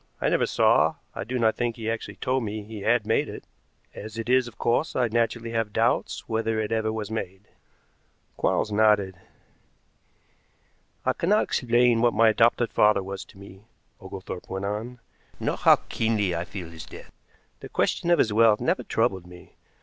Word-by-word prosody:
I - - +1
never - - +1
saw, - - +3 0.2
I - - -5
do 125 +5 -3
not 110 -2 +2
think 120 -1 -2
he 115 -2 -6
actually 115 0 -4
told 130 0 -1
me 105 0 -4
he 105 0 -9
had 115 +1 +2
made 110 - +1
it. - - -8 0.5
As 110 +1 -9
it 115 +1 -4
is, 130 -1 +3
of 120 - -12
course, 120 +7 0
I 125 -2 +2
naturally 115 0 -1
have 115 -2 -1
doubts - - 0
whether 110 0 -1
it 105 -1 -2
ever 110 -1 0
was 110 -1 -5
made." 95 -3 -5 0.9
Quarles - - 0
nodded. 105 -2 +3 1.9
"I - - +2
cannot 205 +5 +2
explain 120 -1 +2
what 120 0 +2
my 115 +1 +5
adopted 115 +2 +2
father 105 -2 +4
was 95 0 -6
to - - -19
me," 100 +1 -14 0.4
Oglethorpe 95 -2 -8
went 95 +1 -4
on, 110 +5 -4 0.4
"nor - - -1
how - - +6
keenly 105 -5 0
I 85 +1 -3
feel 90 -2 -8
his 80 -1 -10
death. - - -12 0.5
The - - -10
question 170 - 0
of 175 - +5
his 110 - +2
wealth 110 -1 +5
never - - 0
troubled 95 -2 -1
me. 90 0 -15
110 Hz, 180 wpm, -25 LUFS, 100-115 Hz, 1.9 s, how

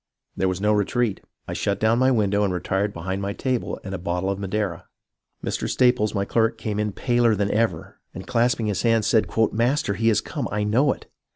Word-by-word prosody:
There 95 - 0
was 95 -1 -1
no 105 +2 +2
retreat. 105 +1 0 0.3
I - - -4
shut 100 -1 -1
down 110 +2 +3
my 130 +1 +4
window 105 -4 +2
and 100 - +1
retired 95 +3 -1
behind 95 +2 -4
my 100 0 -2
table 130 0 -2
and 95 -2 -6
bottle 90 +1 -1
of 100 - -4
madeira. 100 -3 -3 0.6
Mr. - - -2
Staples, 125 -4 +2
my 100 0 0
clerk, 115 +2 +1
came 105 -2 -3
in 105 0 0
paler 120 +1 +2
than 100 0 0
ever, 115 +1 -1
and, - - -8
clasp 120 +1 +1
ing 115 - -1
his 105 -3 -1
hands, 115 -2 +2
said: 110 0 +3 0.2
' - - +1
Master, 120 +1 +1
he 115 +4 +2
is 110 - +3
come. - - -4
I 105 +1 -1
know 125 +7 +3
it. - - -7
105 Hz, 215 wpm, -23 LUFS, 100-115 Hz, 0.6 s, my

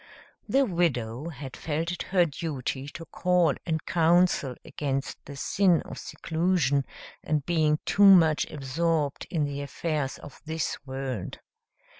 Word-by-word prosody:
The 275 0 +4
widow 150 - -1
had 140 -4 -8
felt 160 +2 -2
it 180 - -4
her 180 -2 +4
duty 140 -4 -4
to 165 +3 -8
call 180 -2 +2
and 160 -2 -1
counsel 170 -5 +3
against 135 -2 -3
the 140 - -9
sin 180 +4 +2
of - - -8
seclusion 160 -5 0 0.4
and 150 -2 -1
being 155 -3 +2
too 205 - +4
much 165 -6 +6
absorbed 150 +1 -1
in 160 -3 0
the 140 0 -4
affairs 145 0 -2
of 145 - -13
this 160 0 -2
world. 130 -7 -4
155 Hz, 135 wpm, -27 LUFS, 140-170 Hz, 0.4 s, much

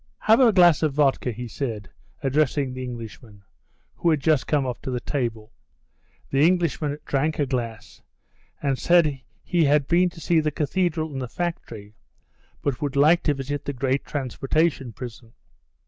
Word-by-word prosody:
"Have 220 +3 +5
a 250 -4 +6
glass 175 -6 +5
of 155 -3 +1
vodka," 135 -3 +2
he 120 +2 -6
said, 110 -5 -5 0.4
addressing 140 -1 +1
the 130 0 -6
Englishman, 115 -4 -9 0.5
who 170 - +1
had 155 -3 +2
just 150 -1 +1
come 145 -3 +1
up 125 -1 -4
to - - -5
the 125 -1 -2
table. 115 -5 -4 0.8
The 135 - +1
Englishman 160 -3 +2
drank 150 +3 0
a 145 - +1
glass, 120 -4 -5 0.6
and 135 -2 0
said 155 -6 +3 0.2
he 170 -3 +2
had 145 -1 +3
been 180 +1 +3
to 175 - -14
see 165 +1 +2
the 155 -1 +1
cathedral 160 +2 -1
and 135 -2 -5
the 125 - -4
factory, 115 -10 -5 0.7
but 135 -4 -2
would 145 -2 -2
like 155 +5 +5
to 150 - +2
visit 140 +1 -4
the 145 - -3
great 135 +1 -1
transportation 135 0 -1
prison. 115 0 -10
140 Hz, 165 wpm, -24 LUFS, 125-155 Hz, 0.8 s, a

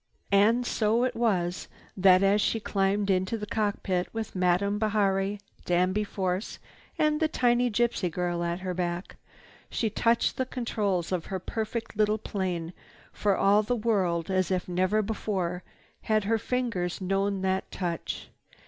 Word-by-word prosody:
And 220 +5 +4
so 225 +1 +1
it 255 - 0
was 185 -7 0 0.3
that, 185 0 +5
as 200 +2 +4
she 225 - +1
climbed 200 -1 0
into 185 +4 0
the 210 - -5
cockpit, 200 -4 -1
with 225 -2 -5
Madame 185 +3 +2
Bihari, 200 -2 +1 0.2
Danby 185 +4 +1
Force, 190 -1 -3 0.4
and 305 0 +2
the 315 - +3
tiny 245 -4 +2
gypsy 230 -4 +1
girl 175 0 -2
at 170 +1 -2
her 185 -1 -3
back, 175 0 -3 0.5
she 220 -3 -1
touched 230 +2 +2
the 260 - 0
controls 205 -9 -1
of 180 -3 -2
her 190 - -2
perfect 225 +4 -4
little 215 0 +2
plane 180 -5 -3 0.4
for 200 -2 +1
all 205 +2 +4
the 245 +4 -1
world 190 -7 0
as 185 -1 +1
if 185 -1 -1
never 185 +4 +1
before 190 -4 -2 0.4
had 215 -1 +1
her 225 +2 +1
fingers 230 -9 -2
known 195 +1 0
that 190 0 0
touch. 175 -3 -4
200 Hz, 150 wpm, -28 LUFS, 185-220 Hz, 0.5 s, that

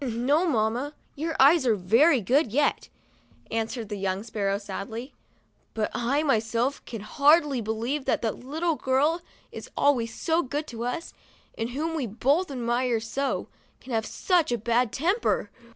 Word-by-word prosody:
"No, 270 +8 +1
mamma, 245 +2 0 0.2
your 320 +3 -3
eyes 290 +3 +6
are 225 - +4
very 235 - +4
good 250 - +2
yet," 290 +5 +1 0.6
an 225 0 0
swered 230 -3 -6
the 210 - -4
young 190 +1 -1
sparrow, 200 -3 -1
sadly. 210 +5 -6 0.3
" - - -41
But 220 -1 -1
I, 275 +6 0
myself, 235 0 0
can 230 -3 -6
hardly 285 +3 +3
believe 230 +6 -2
that - - 0
the 225 - +1
little 320 +9 -2
girl 280 +5 +2
that - - -27 0.3
is - - -9
always 245 -5 +2
so 325 +7 0
good 290 +2 -3
to 235 0 -5
us, 290 +8 -4 0.4
and 225 +1 -3
whom 315 +6 -2
we 280 -6 -1
both 275 - +1
admired 240 -2 0
so, 275 +5 -2 0.3
can 255 - -8
have 220 -1 0
such 350 -7 +1
a 240 - +1
bad 235 +1 +1
temper 370 - 0
250 Hz, 170 wpm, -26 LUFS, 225-295 Hz, 0.6 s, eyes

